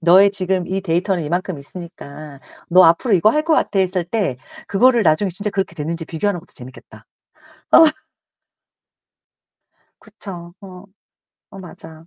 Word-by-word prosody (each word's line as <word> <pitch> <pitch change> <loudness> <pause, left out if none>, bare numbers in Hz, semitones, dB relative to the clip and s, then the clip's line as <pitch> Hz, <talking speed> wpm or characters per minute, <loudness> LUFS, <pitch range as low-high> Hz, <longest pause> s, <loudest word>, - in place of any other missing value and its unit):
너의 185 +4 +6
지금 190 -2 -1
이 190 +2 -2
데이터는 180 0 -1
이만큼 175 +1 -3
있으니까 150 -2 -11 0.3
너 185 +1 +7
앞으로 180 +7 +3
이거 190 +4 +4
할 300 +5 0
것 320 0 +2
같아." 200 - 0
했을 185 -1 0
때 185 - -2 0.3
그거를 240 +3 +3
나중에 170 +3 +2
진짜 200 +4 -2
그렇게 195 -3 -3
됐는지 165 +2 -4
비교하는 175 +4 -2
것도 180 - -16
재밌겠다. 125 +1 -12 0.7
어. 325 - +8 2.2
그쵸. 180 -5 -8
어. 185 -2 -12 0.7
어 195 - -12
맞아. 165 -3 -13
180 Hz, 300 characters per minute, -19 LUFS, 165-195 Hz, 2.2 s, 어